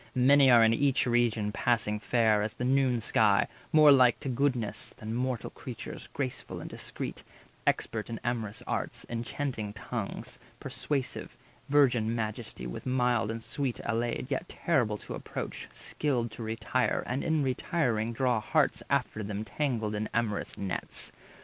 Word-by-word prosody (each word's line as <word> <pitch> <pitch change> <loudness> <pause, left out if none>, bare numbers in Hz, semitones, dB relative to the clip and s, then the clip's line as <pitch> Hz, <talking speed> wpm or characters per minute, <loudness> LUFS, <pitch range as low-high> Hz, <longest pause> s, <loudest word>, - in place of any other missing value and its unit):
Many 135 +2 +6
are 120 -2 +8
in 110 0 +5
each 135 +2 +2
region 120 -3 +2
passing 105 -2 +1
fair 110 -2 +3
As 105 +2 -2
the 120 - -4
noon 130 -2 +3
sky, 105 -2 +4 0.2
more 155 -2 +8
like 130 -3 +6
to 135 - -3
goddesses 125 -4 -1
Than 110 +1 -5
mortal 125 0 -2
creatures, 120 -4 -8
graceful 130 -3 -4
and - - -7
discreet, - - -6 0.4
Expert 110 0 0
in 115 - -4
amorous 115 -4 -2
arts, - - -3
enchanting 115 -2 -3
tongues 105 - -5 0.2
Persuasive, 140 -4 -3 0.3
virgin 120 -6 +4
majesty 110 -2 -4
with - - -6
mild 125 -3 +2
And 115 0 -4
sweet 135 -2 -2
allayed, 120 +3 -1
yet 140 +6 -2
terrible 120 -11 +1
to - - -8
approach, - - -5
160 - - -20
Skilled 125 -6 0
to 115 - -9
retire, 115 +3 0
and 125 +3 -2
in 160 -3 +2
retiring 125 - 0
draw 125 -1 +1
Hearts 105 - +1
after 110 - 0
them 105 +1 -4
tangled 115 -8 -1
in 105 +1 -2
amorous 115 -3 -1
nets. 95 -2 -4
120 Hz, 150 wpm, -30 LUFS, 110-130 Hz, 0.4 s, are